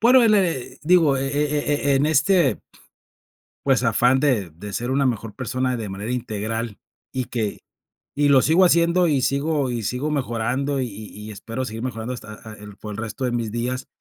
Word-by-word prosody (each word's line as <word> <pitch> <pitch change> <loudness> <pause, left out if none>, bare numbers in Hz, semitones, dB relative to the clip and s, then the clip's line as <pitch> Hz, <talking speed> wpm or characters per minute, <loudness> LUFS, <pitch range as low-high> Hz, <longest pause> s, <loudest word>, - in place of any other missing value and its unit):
Bueno, 250 +3 +6
el 225 -2 +5
le 175 -11 0
digo, 160 -4 +4
e 135 0 -1
e 145 0 0
e - - +4
e - - +4
en 140 +2 +2
este 155 0 +3 1.0
pues, 135 -2 +3
afán 125 +2 +3
de 125 - +1
de 100 +6 -9
ser 120 +5 -2
una 140 +1 +2
mejor 115 -3 -2
persona 130 0 -1
de 110 -3 -5
manera 100 +5 -4
integral, 115 -2 -3 0.3
y 130 -1 -2
que 110 -4 -3 0.5
y 145 0 +2
lo 135 -2 +6
sigo 165 +5 +5
haciendo, 170 +1 +4
y 145 -5 +2
sigo 140 0 0
y 120 -2 -3
sigo 125 +8 -2
mejorando, 135 +1 -1
y 130 - -1
y 105 0 -9 0.2
y - - -7
espero 115 +5 -5
seguir 115 -2 -6
mejorando 120 -1 -4
hasta 105 -3 -9
a 110 +1 -11
a - - -9
el 105 -1 -12
por 105 0 -8
el - - -8
resto 115 +3 -4
de 125 - 0
mis 115 -3 -2
días 125 +2 -3
130 Hz, 205 wpm, -23 LUFS, 115-145 Hz, 1.0 s, Bueno